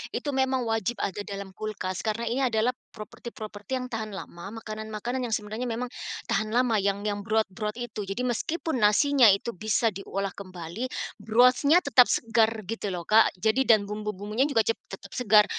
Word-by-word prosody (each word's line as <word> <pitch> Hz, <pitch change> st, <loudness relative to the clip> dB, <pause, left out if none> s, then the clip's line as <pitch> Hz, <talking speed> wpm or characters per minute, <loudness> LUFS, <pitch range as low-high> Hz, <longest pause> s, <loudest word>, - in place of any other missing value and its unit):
Itu 290 Hz, -, -2 dB
memang 265 Hz, -1 st, +1 dB
wajib 225 Hz, 0 st, -1 dB
ada 200 Hz, +1 st, -2 dB
dalam 200 Hz, -1 st, -6 dB
kulkas 190 Hz, -3 st, -4 dB
karena 220 Hz, +2 st, -1 dB
ini 235 Hz, +3 st, -1 dB
adalah 225 Hz, +2 st, +2 dB, 0.2 s
properti-properti 215 Hz, 0 st, -7 dB
yang 255 Hz, -1 st, -4 dB
tahan 220 Hz, -2 st, -4 dB
lama, 190 Hz, +6 st, -8 dB
makanan-makanan 220 Hz, +4 st, -4 dB
yang 225 Hz, -, +1 dB
sebenarnya 215 Hz, +4 st, -4 dB
memang 240 Hz, +2 st, -3 dB, 0.4 s
tahan 215 Hz, +3 st, 0 dB
lama 240 Hz, -4 st, +3 dB
yang 200 Hz, +1 st, 0 dB
yang 205 Hz, -1 st, -1 dB
broth-broth 215 Hz, 0 st, -1 dB
itu. 220 Hz, -4 st, -5 dB
Jadi 195 Hz, +6 st, -3 dB
meskipun 285 Hz, +4 st, -1 dB
nasinya 240 Hz, +4 st, +5 dB
itu 200 Hz, +4 st, +3 dB
bisa 215 Hz, +3 st, +1 dB
diolah 195 Hz, 0 st, -4 dB
kembali, 185 Hz, +4 st, -6 dB, 0.3 s
broth-nya 250 Hz, +9 st, +4 dB
tetap 250 Hz, -3 st, +6 dB
segar, 225 Hz, -1 st, +2 dB
gitu 215 Hz, +1 st, -4 dB
loh, 175 Hz, -, -5 dB
Kak. 215 Hz, +5 st, +4 dB
Jadi 220 Hz, +7 st, +1 dB
dan 220 Hz, -3 st, +6 dB
bumbu-bumbunya 210 Hz, +4 st, -2 dB
juga 230 Hz, -7 st, +2 dB
cep 230 Hz, -, -1 dB
tetap 195 Hz, 0 st, -10 dB
segar. 215 Hz, -4 st, +5 dB
220 Hz, 165 wpm, -27 LUFS, 205-245 Hz, 0.4 s, tetap